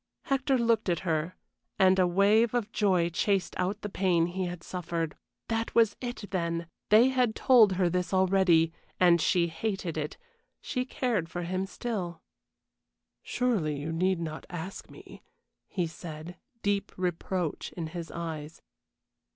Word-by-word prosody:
Hector 275 Hz, 0 st, +1 dB
looked 230 Hz, -4 st, +2 dB
at 170 Hz, -2 st, 0 dB
her, 165 Hz, 0 st, -1 dB, 0.4 s
and 190 Hz, 0 st, +5 dB
a 180 Hz, -, +5 dB
wave 210 Hz, +6 st, +3 dB
of 220 Hz, -3 st, -1 dB
joy 185 Hz, -5 st, +2 dB
chased 195 Hz, +2 st, 0 dB
out 190 Hz, +3 st, -1 dB
the -, -, -2 dB
pain 180 Hz, -4 st, +2 dB
he 185 Hz, +2 st, -2 dB
had 175 Hz, -1 st, -7 dB
suffered. 170 Hz, -3 st, -3 dB, 0.3 s
That 225 Hz, 0 st, -2 dB
was 225 Hz, -3 st, +4 dB
it, 245 Hz, -4 st, -5 dB
then! 170 Hz, -2 st, -1 dB, 0.2 s
They 225 Hz, +5 st, +7 dB
had 250 Hz, -4 st, +1 dB
told 230 Hz, -7 st, +6 dB
her 185 Hz, -1 st, +2 dB
this 180 Hz, +1 st, -1 dB
already, 185 Hz, -4 st, +4 dB, 0.3 s
and 175 Hz, -2 st, +5 dB
she 175 Hz, +1 st, +3 dB
hated 170 Hz, -1 st, -3 dB
it 150 Hz, 0 st, -4 dB, 0.4 s
she 250 Hz, -2 st, -2 dB
cared 230 Hz, -10 st, -1 dB
for 175 Hz, -1 st, -4 dB
him 185 Hz, +2 st, -2 dB
still. 190 Hz, -7 st, -4 dB, 1.0 s
"Surely 200 Hz, -13 st, 0 dB
you 150 Hz, +3 st, -4 dB
need 185 Hz, +2 st, +1 dB
not 160 Hz, -2 st, -5 dB
ask 175 Hz, +2 st, -7 dB
me," -, -, -13 dB, 0.5 s
he 180 Hz, -, -1 dB
said, 165 Hz, +1 st, -8 dB, 0.3 s
deep 200 Hz, 0 st, 0 dB
reproach 180 Hz, -2 st, -2 dB
in 170 Hz, -, -4 dB
his 165 Hz, +1 st, -6 dB
eyes. 160 Hz, -2 st, -6 dB
185 Hz, 150 wpm, -29 LUFS, 170-210 Hz, 1.0 s, They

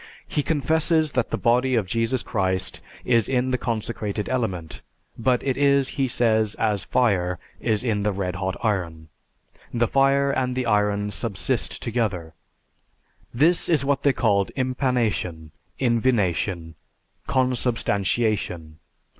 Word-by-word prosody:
He 150 Hz, -, 0 dB
confesses 160 Hz, +1 st, +1 dB
that 125 Hz, -3 st, 0 dB
the -, -, -1 dB
body 125 Hz, +2 st, +2 dB
of 110 Hz, -4 st, +1 dB
Jesus 115 Hz, +5 st, 0 dB
Christ 95 Hz, -3 st, -1 dB, 0.2 s
is 115 Hz, -3 st, +2 dB
in 130 Hz, 0 st, +1 dB
the 125 Hz, -, +1 dB
consecrated 110 Hz, -3 st, -3 dB
element, 90 Hz, -, -3 dB, 0.3 s
but 125 Hz, +1 st, +1 dB
it 135 Hz, -2 st, -1 dB
is, 140 Hz, -1 st, +3 dB
he 135 Hz, -1 st, -1 dB
says, 110 Hz, -4 st, +2 dB
as 105 Hz, -4 st, 0 dB
fire 95 Hz, -8 st, +1 dB, 0.2 s
is 110 Hz, -2 st, 0 dB
in 110 Hz, -4 st, 0 dB
the 105 Hz, +1 st, +1 dB
red 95 Hz, -2 st, -3 dB
hot 95 Hz, 0 st, -3 dB
iron. 85 Hz, -7 st, -2 dB, 0.6 s
The 120 Hz, -1 st, +1 dB
fire 135 Hz, +1 st, +3 dB
and 125 Hz, -2 st, -1 dB
the 130 Hz, -1 st, -1 dB
iron 105 Hz, -1 st, +1 dB
subsist 105 Hz, -3 st, -1 dB
together. 105 Hz, -9 st, -2 dB, 1.0 s
This 160 Hz, +8 st, +2 dB
is 150 Hz, -5 st, +2 dB
what 140 Hz, -1 st, +1 dB
they 140 Hz, -, +4 dB
called 100 Hz, -6 st, +1 dB
impanation, 120 Hz, -, -1 dB, 0.3 s
invination, 100 Hz, -, 0 dB, 0.5 s
consubstantiation. 110 Hz, -, 0 dB
115 Hz, 130 wpm, -24 LUFS, 100-130 Hz, 1.0 s, they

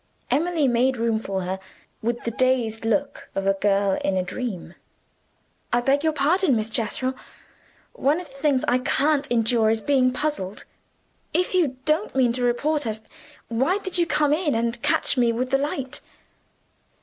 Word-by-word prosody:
Emily 325 Hz, -2 st, +2 dB
made 255 Hz, +2 st, +2 dB
room 230 Hz, -1 st, +1 dB
for 195 Hz, -3 st, -3 dB
her 185 Hz, +1 st, -3 dB, 0.4 s
with 235 Hz, +2 st, -2 dB
the 235 Hz, -, -2 dB
dazed 235 Hz, -3 st, 0 dB
look 280 Hz, +5 st, -1 dB
of 195 Hz, -, -1 dB
a 195 Hz, -, +4 dB
girl 195 Hz, 0 st, +1 dB
in 190 Hz, -1 st, +1 dB
a 185 Hz, -, +1 dB
dream. 185 Hz, -3 st, -5 dB, 1.0 s
"I 240 Hz, -, +3 dB
beg 275 Hz, +4 st, +1 dB
your 320 Hz, -, +3 dB
pardon, 310 Hz, +1 st, +2 dB
Miss 220 Hz, 0 st, -2 dB
Jethro, 235 Hz, +4 st, -1 dB, 0.8 s
one 305 Hz, -, +1 dB
of 360 Hz, -, -7 dB
the 270 Hz, -, -18 dB
things 275 Hz, -1 st, +1 dB
I 250 Hz, +1 st, +3 dB
can't 290 Hz, +3 st, +2 dB
endure 230 Hz, -1 st, +2 dB
is 220 Hz, 0 st, +1 dB
being 260 Hz, -1 st, +3 dB
puzzled. 250 Hz, -8 st, -3 dB, 0.7 s
If 360 Hz, +1 st, +1 dB
you 310 Hz, -9 st, +1 dB
don't 315 Hz, +5 st, +1 dB
mean 250 Hz, -3 st, +3 dB
to 250 Hz, -, -2 dB
report 285 Hz, +4 st, +1 dB
us, 220 Hz, 0 st, -3 dB, 0.5 s
why 265 Hz, -, +1 dB
did 375 Hz, -3 st, -4 dB
you 340 Hz, -, +2 dB
come 295 Hz, -3 st, +2 dB
in 305 Hz, -4 st, +1 dB
and 230 Hz, +1 st, -1 dB
catch -, -, +1 dB
me 240 Hz, -1 st, +4 dB
with 250 Hz, +2 st, -2 dB
the 270 Hz, -, +3 dB
light?" 275 Hz, -2 st, -3 dB
255 Hz, 175 wpm, -24 LUFS, 225-295 Hz, 1.0 s, a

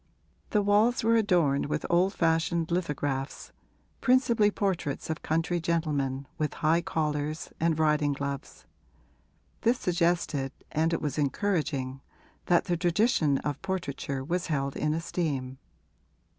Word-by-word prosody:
The 210 Hz, -2 st, +2 dB
walls 210 Hz, +5 st, +3 dB
were 230 Hz, +1 st, +4 dB
adorned 175 Hz, -12 st, +2 dB
with -, -, -2 dB
old 180 Hz, +3 st, +2 dB
fashioned 165 Hz, 0 st, +1 dB
lithographs, 145 Hz, -6 st, -2 dB, 0.5 s
principally 240 Hz, -4 st, +4 dB
portraits 180 Hz, -8 st, -2 dB
of 160 Hz, -, -4 dB
country 165 Hz, +2 st, 0 dB
gentlemen 145 Hz, -5 st, -1 dB
with 150 Hz, -1 st, -1 dB
high 165 Hz, +2 st, +4 dB
collars 150 Hz, -1 st, -2 dB
and 165 Hz, -1 st, +2 dB
riding 150 Hz, -2 st, +2 dB
gloves: 140 Hz, 0 st, -5 dB, 1.0 s
this 240 Hz, +2 st, +3 dB
suggested 170 Hz, -, 0 dB, 0.2 s
and 160 Hz, +2 st, +1 dB
it 165 Hz, -, -1 dB
was 150 Hz, 0 st, -2 dB
encouraging 140 Hz, -4 st, -1 dB, 0.5 s
that 175 Hz, -1 st, +4 dB
the 175 Hz, -3 st, 0 dB
tradition 175 Hz, -, +2 dB
of 145 Hz, -2 st, -2 dB
portraiture 140 Hz, -7 st, -3 dB
was 175 Hz, +5 st, -2 dB
held 140 Hz, -3 st, -1 dB
in 150 Hz, 0 st, 0 dB
esteem. 140 Hz, -6 st, -3 dB
160 Hz, 125 wpm, -28 LUFS, 145-180 Hz, 1.0 s, were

